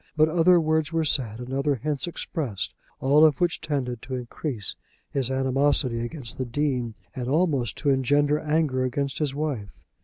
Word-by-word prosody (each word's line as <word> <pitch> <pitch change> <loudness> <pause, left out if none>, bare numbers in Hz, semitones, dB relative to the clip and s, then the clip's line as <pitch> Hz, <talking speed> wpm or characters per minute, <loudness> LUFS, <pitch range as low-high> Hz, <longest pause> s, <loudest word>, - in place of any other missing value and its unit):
But 155 +1 +5
other 175 +2 +5
words 155 0 +1
were 165 -1 +1
said 125 -7 0
and 125 +1 -6
other 140 +1 +1
hints 145 +5 -2
expressed, 135 - -3 0.3
all 145 +3 +5
of 155 -4 +5
which 175 -1 +1
tended 135 -7 -2
to 130 - -5
increase 125 - -4 0.4
his 135 -3 -1
animosity 130 -2 +1
against 125 +2 -4
the 130 - 0
Dean, 125 -3 -1 0.2
and 125 -2 -3
almost 140 - +1
to 145 - +2
engender 145 +3 +3
anger 150 -4 +1
against 135 +2 -2
his 145 -3 -1
wife. 140 -10 -4
140 Hz, 165 wpm, -25 LUFS, 125-155 Hz, 0.4 s, But